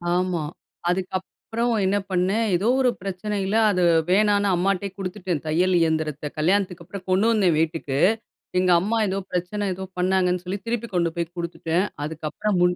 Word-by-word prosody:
ஆமா. 180 -3 0 0.5
அதுக்கப்புறம் 190 +6 -2
என்ன 195 +2 +2
பண்ணேன், 190 +5 +1
ஏதோ 195 +6 0
ஒரு 250 - +4
பிரச்சனையில 195 +1 -2 0.2
அது 180 -2 +1 0.3
வேணான்னு 205 +1 +3
அம்மாட்டயே 195 +2 0
குடுத்துட்டேன். 185 -4 -3
தையல் 180 +4 +2
இயந்திரத்த. 155 -2 -1
கல்யாணத்துக்கு 180 +1 +1
அப்புறம் 190 0 -9
கொண்டு 190 +3 +3
வந்தேன் 190 -8 +3
வீட்டுக்கு, 155 -4 -1 0.6
எங்க 185 0 +3
அம்மா 220 +5 0
ஏதோ, 190 0 -1
பிரச்சனை 180 +4 -2
ஏதோ 190 +1 -6
பண்ணாங்கன்னு 180 -1 +2
சொல்லி, 190 +3 -3
திருப்பி 235 0 -2
கொண்டு 170 -1 +2
போய் 170 0 -3
குடுத்துட்டேன். 170 +1 -1 0.2
அதுக்கப்புறம் 160 +6 -2
முன் 180 0 +4
185 Hz, 145 wpm, -24 LUFS, 170-200 Hz, 0.6 s, ஒரு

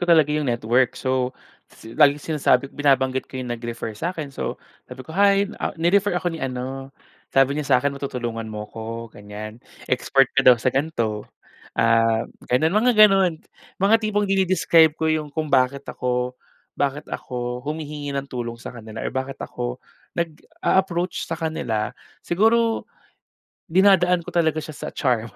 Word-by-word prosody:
ko 175 - -1
talaga 155 -3 +5
'yong 150 -2 0
network. 120 +2 +1
So 130 -1 -1 0.3
si 110 - -13
laging 145 -1 +5
sinasabi 135 -1 +2
binabanggit 130 -2 +1
ko 130 - -8
'yong 125 -2 -3
nag-refer 115 -1 -5
sa'kin 155 - -4
so, - - -3 0.3
sabi 125 +1 -9
ko, - - -13
"Hi, 200 +1 +4 0.2
ah, - - -2
ni-refer 185 +4 +2
ako 175 0 -1
ni 165 - -6
ano. 135 +1 -5 0.4
Sabi 135 +2 +4
niya 150 - -3
sakin 140 +3 +1
matutulungan 120 -5 -4
mo 105 -1 -5
'ko, 115 0 -6
ganyan, 105 +2 -9 0.3
expert 130 +1 +3
ka 135 - +3
daw 125 - +10
sa 125 +2 0
ganito." 115 -8 -1 0.5
Ah, 115 0 +3 0.2
gano'n 155 +7 +2
mga 235 +4 +4
gano'n 195 -5 +6 0.4
mga 200 +4 +3
tipong 210 -1 0
dine-describe 180 -5 +4
ko 160 0 0
'yong 155 -1 -2
kung 155 -2 -2
bakit 135 +1 +3
ako 125 0 -2 0.4
bakit 140 +1 -1
ako 125 -1 -4
humihingi 150 -1 -4
ng 140 - -2
tulong 120 -2 -4
sa - - -7
kanila 110 -2 -9
or - - 0
bakit 130 +1 -3
ako 120 0 -4 0.4
nag-a-approach 175 +2 -1
sa - - -3
kanila. 120 -10 -2 0.4
Siguro 225 +5 +2 0.9
dinadaan 180 -1 +4
ko - - -6
talaga 160 -2 +2
siya 155 0 -8
sa - - -6
charm 115 -4 0
140 Hz, 155 wpm, -23 LUFS, 125-170 Hz, 0.9 s, daw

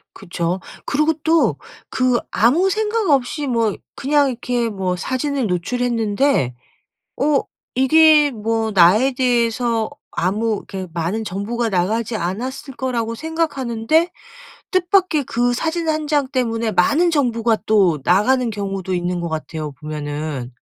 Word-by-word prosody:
그쵸. 175 -1 -3 0.3
그러고 305 +3 +2
또 325 0 +3 0.3
그 255 -1 +2
아무 300 - +3
생각 430 -1 0
없이 280 +2 +1
뭐 230 -5 +1 0.2
그냥 285 0 +2
이렇게 245 -1 -2
뭐 190 -3 -2
사진을 260 +4 -2
노출했는데 225 - 0 0.6
어 290 -1 +3 0.4
이게 300 +2 +5
뭐 225 0 -1
나에 200 +8 +5
대해서 235 -2 +1 0.2
아무 210 +5 0
이렇게 190 -2 -7
많은 175 +6 -2
정보가 220 +5 -2
나가지 215 +5 0
않았을 240 - -4
거라고 235 -3 -2
생각하는데 315 -1 0 0.6
뜻밖에 365 -4 +2
그 245 -2 0
사진 325 +5 -2
1 310 -1 0
장 290 -2 +1
때문에 230 -4 -1
많은 290 - +3
정보가 235 -7 +1
또 190 -8 +3
나가는 240 +7 +3
경우도 195 -3 -3
있는 175 0 -2
것 170 - -3
같아요 155 -1 -5
보면은. 145 -2 -5
235 Hz, 265 characters per minute, -20 LUFS, 195-280 Hz, 0.6 s, 이게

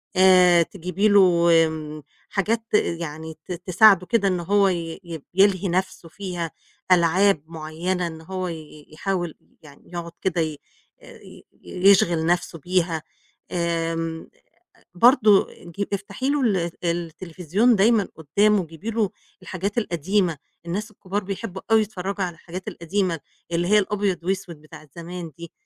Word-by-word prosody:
آآ 185 -2 +6
تجيبي 180 +3 -1
له 205 -1 +6
وم 165 -3 +2 0.3
حاجات 220 +4 0
يعني 160 -4 -1
ت - - -9
تساعده 185 +2 +4
كده 220 -2 +1
إن 185 -2 0
هو 200 +3 +3
ي 170 -1 -4
يب 165 -4 -8
يلهي 195 0 +3
نَفْسه 180 -1 -2
فيها، 175 -3 -5 0.4
ألعاب 175 -1 +4
معيّنة 165 +3 -3
إن 160 -1 -8
هو 185 +2 -4
ي 170 - -3
ي 155 -2 -12
يحاول 175 -1 -2 0.3
يعني 145 -2 -16
يقعُد 170 -1 -5
كده 175 -3 0
ي 155 -2 -2 0.4
آآ - - -14
ي - - -14 0.2
يشغِل 180 -3 +3
نَفْسه 175 0 0
بيها. 170 -1 -1 0.5
آمم 165 -1 -2 0.5
آآ - - -27
برضه 215 -1 +5
آآ - - -17
جيب 200 - -2
افتحي 200 +7 -4
له 290 -1 +1
ال 185 -7 +1
التليفزيون 175 +6 0
دايمًا 210 +1 +3
قُدّامه، 195 +5 +2
جيبي 165 +8 -7
له 220 -3 0 0.3
الحاجات 200 +4 -4
القديمة، 175 -3 0 0.3
الناس 205 +6 -3
الكُبار 200 0 -4
بيحبّوا 195 0 -6
أوي 225 0 +6
يتفرّجوا 195 -1 -3
على 175 -2 -5
الحاجات 180 +3 -8
القديمة 170 -1 -2 0.3
اللي 175 +1 0
هي 210 0 +5
الأبيض 200 -3 -1
وأسود 185 -2 -3
بتاعة 155 0 -14
زمان 170 -1 -7
دي 170 0 -9
180 Hz, 145 wpm, -23 LUFS, 165-195 Hz, 0.5 s, آآ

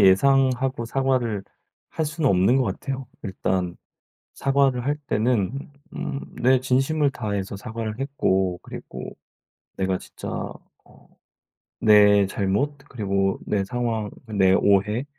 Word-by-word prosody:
예상하고 130 +4 +4
사과를 125 -5 0 0.5
할 160 - -1
수는 155 -1 0
없는 95 +7 +4
것 135 - +3
같아요. 135 +1 -4 0.2
일단 95 -3 -2 0.6
사과를 135 -3 +2
할 145 +2 0
때는 120 +3 0 0.2
음 140 - -4 0.2
내 130 +1 +5
진심을 135 +3 +2
다해서 100 -5 -3
사과를 110 +1 -5
했고 95 -10 0
그리고 - - -8 0.7
내가 95 -1 0
진짜 - - -9 0.6
어 - - -21 0.7
내 105 -2 +6
잘못 100 +10 -1
그리고 100 -4 0
내 100 -2 0
상황 115 -1 -2 0.2
내 95 -4 +3
오해 100 +5 +3
115 Hz, 225 characters per minute, -24 LUFS, 100-135 Hz, 0.7 s, 내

